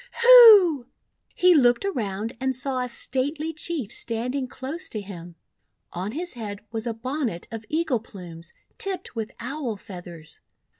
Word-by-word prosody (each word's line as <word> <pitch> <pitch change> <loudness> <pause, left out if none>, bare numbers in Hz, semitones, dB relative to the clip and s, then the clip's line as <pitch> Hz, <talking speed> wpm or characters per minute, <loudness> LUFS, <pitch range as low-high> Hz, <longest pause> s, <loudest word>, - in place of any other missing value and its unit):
Hu!" 420 - +8 0.5
He 360 0 +5
looked 245 +1 +3
around 220 - -3
and 265 0 -1
saw 260 +1 -2
a 250 - -2
stately 290 +6 -2
Chief 305 -7 -3
standing 250 +4 -1
close 280 +8 -6
to 215 - -4
him. 175 -4 -10 0.6
On 185 +5 -4
his 345 +4 -3
head 210 -4 -7
was 225 +1 -4
a 230 - -1
bon 260 +5 -3
net 170 -5 -6
of 225 -1 -7
eagle 310 -6 0
plumes 170 -6 -9 0.3
tipped 375 -8 -2
with 220 -2 -4
Owl 250 -1 -4
Feathers. 175 -6 -11
245 Hz, 150 wpm, -24 LUFS, 210-305 Hz, 0.6 s, Hu